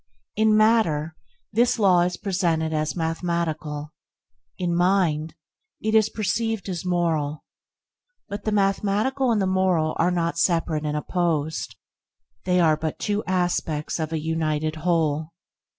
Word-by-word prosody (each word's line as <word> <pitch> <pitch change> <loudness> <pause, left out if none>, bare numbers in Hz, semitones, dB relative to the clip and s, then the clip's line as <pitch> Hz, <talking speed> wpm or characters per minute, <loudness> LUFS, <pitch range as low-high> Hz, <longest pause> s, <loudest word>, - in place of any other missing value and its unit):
In 215 0 +4
matter, 170 -9 +2 0.4
this 240 +3 +3
law 190 -5 +4
is 175 +1 0
presented 170 -5 0
as 155 -1 -1
mathematical; 160 -3 -2 0.7
in 175 -2 -1
mind, 170 -4 +1 0.4
it 220 0 -1
is 220 -1 +4
perceived 220 0 -2
as 175 -3 -4
moral. 165 -5 -1 0.8
But 205 +1 -6
the 215 - -1
mathematical 210 +6 +1
and 220 - +2
the 195 - +1
moral 185 -4 +1
are 170 - +3
not 170 -1 -1
separate 165 -3 +1
and 150 0 -1
opposed; 160 -2 -1 0.7
they 180 0 +2
are 160 -3 +4
but 155 0 -3
two 205 0 -1
aspects 175 -4 -1
of 160 -1 -2
a 160 - -1
united 155 -1 -1
whole. 160 -1 0
170 Hz, 135 wpm, -24 LUFS, 155-195 Hz, 0.8 s, In